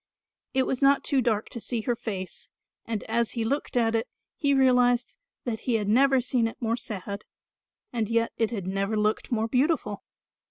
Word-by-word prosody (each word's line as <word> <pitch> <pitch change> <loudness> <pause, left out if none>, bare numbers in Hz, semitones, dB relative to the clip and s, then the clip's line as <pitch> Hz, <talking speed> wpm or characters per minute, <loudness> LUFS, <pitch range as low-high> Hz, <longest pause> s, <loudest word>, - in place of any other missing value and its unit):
It 260 -1 +3
was 265 - -2
not 275 0 +5
too 270 -2 +2
dark 220 -3 0
to 235 - -6
see 230 0 -3
her 240 +2 0
face, 195 -5 -6 0.4
and 225 -2 -3
as 230 0 0
he 230 - -1
looked 275 +1 -1
at 230 -1 +3
it 225 +2 0 0.3
he 285 -4 +1
realised 250 -2 +3 0.3
that 225 -3 -2
he 245 - 0
had 210 -2 0
never 265 +5 +5
seen 245 -2 +1
it 225 - -8
more 230 -1 0
sad 200 -3 -5 0.7
and 225 -3 -1
yet 230 0 +1
it 225 -2 +1
had 205 -6 -4
never 195 +3 -1
looked 210 +3 0
more 225 -1 +1
beautiful. 255 -5 0
230 Hz, 190 wpm, -27 LUFS, 215-250 Hz, 0.7 s, not